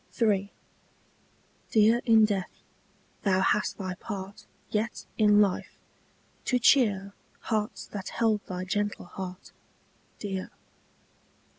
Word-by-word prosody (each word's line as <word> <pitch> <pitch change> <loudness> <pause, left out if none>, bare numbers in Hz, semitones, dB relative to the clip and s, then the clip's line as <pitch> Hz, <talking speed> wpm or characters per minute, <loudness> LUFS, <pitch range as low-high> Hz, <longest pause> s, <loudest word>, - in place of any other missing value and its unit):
III. 200 -3 +2 1.2
Dear 225 +2 +4
in 225 -2 +6
death, 200 -4 -3 0.6
thou 190 -2 +2
hast 210 +2 +1
thy 185 -2 -3
part 195 +1 -7 0.2
Yet 220 +2 -2
in 210 -1 +6
life, 200 -3 0 0.7
to 250 - +2
cheer 205 -6 +3 0.3
Hearts 215 -1 -2
that 200 -2 -6
held 220 -3 +1
thy 185 0 -4
gentle 205 +1 -2
heart 180 +1 -8 0.7
Dear. 195 -2 -4
205 Hz, 105 wpm, -28 LUFS, 190-220 Hz, 1.2 s, in